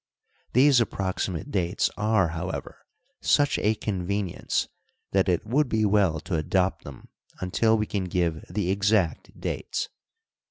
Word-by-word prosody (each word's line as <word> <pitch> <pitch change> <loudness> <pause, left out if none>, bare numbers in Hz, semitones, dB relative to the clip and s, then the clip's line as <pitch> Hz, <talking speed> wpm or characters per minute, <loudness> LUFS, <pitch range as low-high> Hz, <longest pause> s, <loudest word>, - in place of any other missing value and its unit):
These 130 0 +6
approximate 95 -5 -2
dates 90 0 0
are, 105 -4 +2
however, 85 +3 -6 0.3
such 145 0 +3
a 110 +1 +2
convenience 100 -2 -2 0.4
that 95 -1 +2
it 90 +2 +1
would 130 +5 +1
be 110 -1 +2
well 100 -6 +3
to 85 - -2
adopt 90 +2 0
them 70 -3 -11 0.3
until 110 +5 +2
we 105 - 0
can 100 -3 -2
give 85 -3 -1
the 100 -3 -1
exact 100 -4 0
dates. - - -3
95 Hz, 130 wpm, -26 LUFS, 90-110 Hz, 0.4 s, These